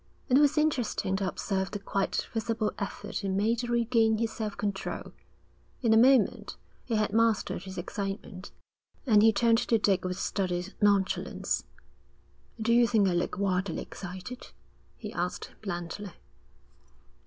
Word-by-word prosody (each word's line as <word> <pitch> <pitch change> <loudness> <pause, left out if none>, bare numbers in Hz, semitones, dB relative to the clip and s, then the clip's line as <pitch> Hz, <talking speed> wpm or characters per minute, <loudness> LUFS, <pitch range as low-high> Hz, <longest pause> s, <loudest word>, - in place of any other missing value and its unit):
It 260 +2 +6
was 295 +1 +4
interesting 255 -10 +1
to 195 -1 -1
observe 190 +1 -2
the - - -4
quite 195 -1 -2
visible 225 -1 -1
effort 205 +1 -4
he 200 - -3
made 210 +5 +1
to 240 - -3
regain 230 -2 +3
his 225 0 -1
self 215 -2 -4
control. 200 -2 -3 0.7
In 225 -2 +4
a - - +6
moment 245 0 +4 0.3
he 230 - -2
had 215 -1 0
mastered 220 -4 +1
his 190 0 -8
excitement, 195 +1 -5 0.6
and 215 -5 +5
he 225 +1 +7
turned 230 +2 +3
to 230 - +2
Dick 195 -3 +2
with 180 0 -3
studied 185 -1 -2
nonchalance. 200 -2 +1 0.9
'Do 225 +1 +2
you 240 0 +5
think 215 -4 +3
I - - 0
look 175 +1 -1
wildly 190 -2 0
excited?' 190 +6 -8 0.5
he - - -7
asked - - -3
blandly. 175 0 -5
210 Hz, 145 wpm, -29 LUFS, 195-230 Hz, 0.9 s, he